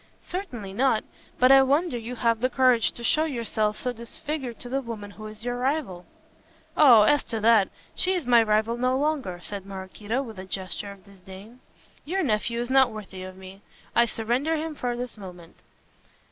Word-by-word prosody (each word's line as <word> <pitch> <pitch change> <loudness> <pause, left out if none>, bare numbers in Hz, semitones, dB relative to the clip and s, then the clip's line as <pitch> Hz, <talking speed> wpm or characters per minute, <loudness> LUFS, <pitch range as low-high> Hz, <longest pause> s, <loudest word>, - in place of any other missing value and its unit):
"Certainly 250 - -6
not. 235 0 +2 0.3
But 255 +1 +5
I 270 0 +9
wonder 285 +3 +2
you 235 +1 -5
have 230 -2 +1
the 255 +2 +1
courage 255 -3 +3
to 240 - -10
show 310 +6 +3
yourself 220 -6 -1
so 250 -1 -2
disfigured 245 +2 -5
to - - -6
the 270 +3 -1
woman 220 -5 -7
who 215 +1 -9
is 215 +1 -10
your 245 0 -2
rival." 255 - -2 0.7
"Oh, 245 -8 +8
as 290 +7 +3
to 225 - -3
that, 220 -3 +5 0.2
she 375 +1 +2
is 350 -6 -3
my 240 -1 +6
rival 220 +1 +1
no 255 +1 +1
longer," 275 - -1
said 200 +3 -6
Maraquito, 200 +6 -4
with 220 -6 -9
a 185 - -7
gesture 190 +2 -5
of 195 -1 -15
disdain, 200 +4 -13 0.4
"your 380 +6 -1
nephew 235 -2 0
is 240 +1 -3
not 265 -1 +5
worthy 200 -3 -8
of 185 0 -9
me. 190 +1 -12 0.3
I 235 0 +5
surrender 245 +9 0
him 315 0 -3
from 245 -4 -3
this 245 -3 -6
moment." 180 -4 -11
235 Hz, 190 wpm, -26 LUFS, 205-265 Hz, 0.7 s, I